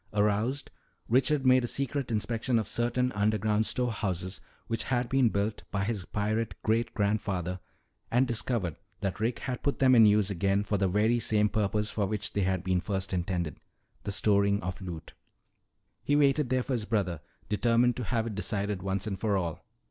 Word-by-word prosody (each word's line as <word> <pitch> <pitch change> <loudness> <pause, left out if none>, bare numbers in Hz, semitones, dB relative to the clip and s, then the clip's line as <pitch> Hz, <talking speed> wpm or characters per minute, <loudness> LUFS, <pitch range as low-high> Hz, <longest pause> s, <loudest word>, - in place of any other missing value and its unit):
Aroused, 105 +6 0 0.4
Richard 135 +3 +2
made 130 0 +5
a - - -1
secret 140 0 -1
inspection 115 +2 0
of 110 -3 -1
certain 120 +2 0
underground 105 0 +1
storehouses 95 -7 -2 0.2
which 115 -1 -2
had 125 -1 0
been 135 -2 +3
built 105 +1 -1
by 100 -2 -1
his 100 -3 -2
pirate 105 -1 -1
great 115 +1 +1
grandfather 100 -4 -1 0.5
and 125 +3 +3
discovered 115 - -2 0.2
that 95 -3 -2
Rick 115 +2 0
had 125 -2 -4
put 140 - 0
them 130 -1 +5
in 115 -3 +8
use 105 -1 +3
again 100 +2 +1
for 105 0 -1
the 95 - +2
very 110 +5 +2
same 105 -2 +2
purpose 105 0 0
for 105 -3 0
which 105 0 -3
they 100 - 0
had 95 -1 0
been 90 -1 +1
first 95 -1 -2
intended 90 -2 -2 0.4
the - - -3
storing 100 0 +2
of 90 0 -4
loot. 85 -4 -7 0.9
"He 145 - +2
waited 145 -2 +3
there 130 0 +1
for 135 - -3
his 115 -4 -1
brother, 95 -8 -1 0.3
determined 120 +3 +2
to 125 - -3
have 115 0 0
it 115 - -4
decided 100 -1 -2
once 95 +1 -2
and 100 -3 -4
for 105 -2 +1
all. 85 -4 -3
105 Hz, 180 wpm, -29 LUFS, 100-120 Hz, 0.9 s, in